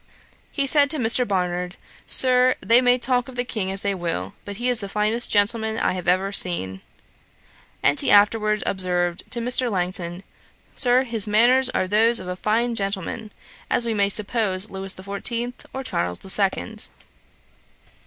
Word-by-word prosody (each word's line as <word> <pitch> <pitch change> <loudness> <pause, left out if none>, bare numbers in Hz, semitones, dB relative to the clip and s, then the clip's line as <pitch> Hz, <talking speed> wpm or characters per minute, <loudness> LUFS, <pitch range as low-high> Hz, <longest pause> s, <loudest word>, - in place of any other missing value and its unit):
He 280 - -2
said 285 +1 +4
to 310 - +2
Mr. 245 0 +1
Barnard, 180 -2 -3 0.3
'Sir, 255 0 +4
they 235 +2 +3
may 250 0 +3
talk 250 0 0
of 260 - -12
the 245 - -2
King 215 -6 -4
as 195 0 +3
they 200 -1 -1
will; 170 - -5
but 200 -1 -8
he 240 +2 -3
is 245 -2 +2
the 200 - -7
finest 215 +3 +1
gentleman 220 +1 +1
I - - -1
have 180 0 -7
ever 185 +2 +1
seen.' 95 - 0 1.0
And 145 - +3
he - - +2
afterwards 210 +1 +2
observed 180 -2 -1
to 240 - -3
Mr. 245 +1 +2
Langton, 180 -1 -1 0.5
'Sir, 250 0 +4
his 230 -5 +1
manners 245 +5 +3
are 185 - -2
those 225 +4 +3
of - - -9
as 180 0 -6
fine 230 +3 -1
a - - -5
gentleman 200 +1 -4 0.4
as 240 - 0
we 230 - -2
may 200 -2 0
suppose 205 -2 -1
Lewis 195 0 -2
the 185 - -12
Fourteenth 235 +5 -5
or 265 - -6
Charles 90 - -3
the 190 - -1
Second.' 190 - 0
210 Hz, 175 wpm, -21 LUFS, 185-240 Hz, 1.0 s, said